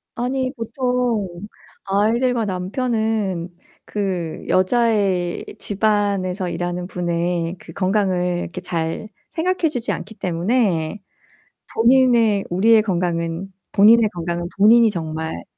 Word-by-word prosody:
아니 255 +2 -1
보통 245 -3 -1 0.6
아이들과 225 +4 +1
남편은 205 -2 -1 0.4
그 185 -6 -3
여자의 190 -3 +1
집안에서 200 -3 0
일하는 175 +1 -3
분의 175 -1 -2
그 165 - -12
건강을 185 -2 0
이렇게 180 - -6
잘 165 +3 -3 0.2
생각해 345 0 +1
주지 245 -5 -3
않기 220 +1 -5
때문에 185 -1 0 0.8
본인의 235 -4 +4
우리의 215 +5 +5
건강은 175 -1 -2 0.2
본인의 220 +2 +6
건강은 170 0 -3
본인이 225 +3 +6
정말 160 - -4
195 Hz, 240 characters per minute, -21 LUFS, 175-230 Hz, 0.8 s, 본인의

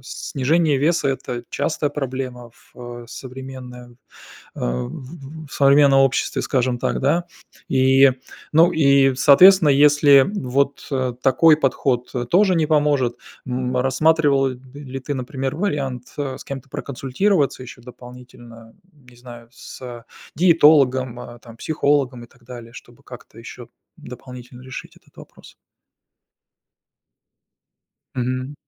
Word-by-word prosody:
Снижение 145 +4 -1
веса, 160 +1 +1
это 125 -2 -4
частая 145 0 -2
проблема 130 -3 -6 0.2
в 120 -1 -10
современном, 125 -1 -10 0.6
а, 60 0 -3
в - - -7
в 150 +2 -11
в - - -17
современном 140 0 +4
обществе, 135 -1 0
скажем 125 -2 -1
так, - - -2
да. 160 +6 +1 0.4
И, 135 0 +4 0.4
ну, 165 +3 +5
и, 140 -3 +3
соответственно, 150 +6 +6
если 145 -1 +5
вот, 140 -3 -2
а, 130 -3 -1
такой 135 +5 +3
подход, 130 -3 -1
э, 120 -1 -2
тоже 185 - +3
не 160 -2 +1
поможет, 145 -5 +1 0.3
м, 125 0 -3
рассматривал, 140 +1 +2
ли 130 +1 -9
ты, 145 +2 -5
например, 130 +1 -4
вариант, 140 - -4
а, 135 -2 -4
с - - -12
кем-то 140 -1 -8
проконсультироваться 140 +3 -1
ещё 120 -1 -12
дополнительно, 120 -2 -14 0.3
не 120 - -18
знаю, 120 -1 -13
с 120 -1 -11 0.3
диетологом, 145 -7 +3
а, 120 -1 -11
там, 115 -1 -15
психологом 140 -4 -1
и - - -15
так 120 0 -26
далее, 120 -1 -11
чтобы - - -15
как-то - - -14
ещё - - -11 0.3
дополнительно 125 0 -12
решить 130 -1 -10
этот - - -26
вопрос? - - -16 2.6
Мгм. 130 +2 -3
130 Hz, 125 wpm, -20 LUFS, 125-145 Hz, 2.6 s, соответственно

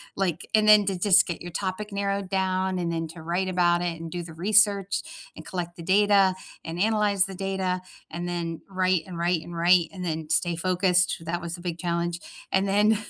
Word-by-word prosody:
like 180 -3 -2
and 215 0 +3
then 210 -1 +8
to 195 -2 0
just 185 +1 +5
get 170 - -5
your 175 - -7
topic 195 +4 -4
narrowed 200 -1 -2
down, 190 -1 0
and 170 -1 -2
then 165 -1 -2
to 165 0 -11
write 175 +3 -1
about 175 -1 +2
it, 165 -2 -3
and 165 - -6
do 175 +1 -5
the 165 -1 -10
research, 200 +2 +2 0.3
and - - -11
collect 175 -2 -5
the 170 - -9
data, 195 +1 +4 0.3
and 165 +1 -6
analyze 210 -3 +2
the 195 -1 -8
data, 190 -1 -2 0.3
and 175 +2 -5
then 170 -2 -4
write 185 -3 +1
and 175 -3 -8
write 170 -1 0
and 170 - -9
write, 170 0 +4
and 185 -2 -7
then 160 -2 -3
stay 170 +2 +1
focused, 180 +1 +2
that 170 +2 -2
was 170 0 -5
the 175 - -12
big 175 -2 -4
challenge 170 -1 -2 0.3
and 190 +1 +2
then 210 +2 +3
180 Hz, 210 wpm, -25 LUFS, 170-195 Hz, 0.3 s, then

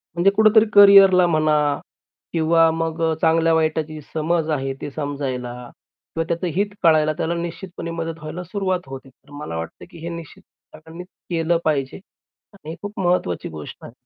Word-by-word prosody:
म्हणजे 185 +3 +3
कुठेतरी 220 +1 +5
करिअरला 195 -3 +8
म्हणा 155 -2 +2 0.8
किंवा 165 0 +3
मग 165 0 -3
अ, - - +1
चांगल्या 165 0 +3
वाईटाची 155 -1 -1
समज 160 0 0
आहे 135 -2 -2
ते 145 - -5
समजायला 135 -5 -4 0.6
किंवा 165 - 0
त्याचं 170 +2 -2
हित 200 +2 +1 0.2
कळायला 155 -2 +4
त्याला 165 - -1
निश्चितपणे 170 0 -6
मदत 165 0 -5
व्हायला 165 +4 -6
सुरुवात 185 0 -2
होते. 135 0 -9
तर 140 +3 -25
मला 145 - -7
वाटत 80 - -7
की - - -13
हे 170 +1 -6
निश्चित 170 -2 -9 0.3
सगळ्यांनीच 160 +3 -11 0.2
केलं 165 0 +1
पाहिजे 140 -4 -1 0.6
आणि 160 -5 -11
हे 165 - -6
खूप 205 0 -7
महत्वाची 175 - 0
गोष्ट 75 -2 -9
आहे. - - -10
165 Hz, 160 wpm, -21 LUFS, 155-175 Hz, 0.8 s, करिअरला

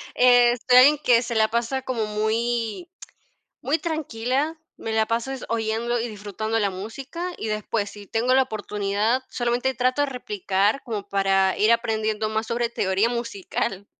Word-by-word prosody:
Este, 245 0 +5
alguien 285 +4 +8
que 240 -1 +5
se 235 -1 -4
la 220 0 +4
pasa 235 +4 -1
como 235 -5 -2
muy 225 - -1 0.7
muy 300 +5 0
tranquila, 300 -1 -2 0.2
me 225 - -5
la 220 0 +2
paso 230 +3 -1
es 270 - -6
oyendo 230 +1 -1
y 235 - -2
disfrutando 215 +1 -3
la 205 -2 +1
música, 270 - -6
y 220 - -4
después 215 -1 -2
si 205 -1 -11
tengo 235 +5 +1
la 265 - +5
oportunidad, 210 +1 -1
solamente 245 +2 0
trato 255 +3 +1
de - - -1
replicar 210 -1 -1
como 210 -5 -5
para 195 -1 +2
ir 215 +2 +4
aprendiendo 220 -2 0
más 220 +1 -1
sobre 235 +1 -1
teoría 195 +1 +1
musical. 200 -4 -3
230 Hz, 160 wpm, -24 LUFS, 215-250 Hz, 0.7 s, alguien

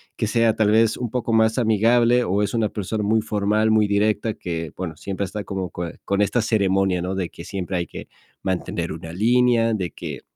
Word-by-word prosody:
que - - -1
sea 115 0 +2
tal 105 -1 +2
vez 110 0 +3
un 120 -2 -3
poco 120 -2 -1
más 110 +1 +3
amigable 120 +2 +3
o 100 +1 0
es 105 +1 -1
una 110 -2 +1
persona 105 +1 -3
muy 110 +2 +2
formal, 105 +1 +1
muy 110 -1 +4
directa, 105 +2 +1
que, 85 -5 -5
bueno, 85 -4 -5
siempre 95 +4 -3
está 105 +2 -5
como 95 -2 -4
co 85 +1 -5 0.2
con 100 +1 0
esta 120 +4 +1
ceremonia, 95 -4 +1
¿no?, 95 +1 -2
de 95 -3 -2
que 85 - -11
siempre 95 -2 -3
hay 85 - -1
que - - -9 0.3
mantener 95 -2 -2
una 80 0 -7
línea, 115 +2 +3
de 90 -6 -2
que, - - -7
105 Hz, 210 wpm, -22 LUFS, 95-110 Hz, 0.3 s, muy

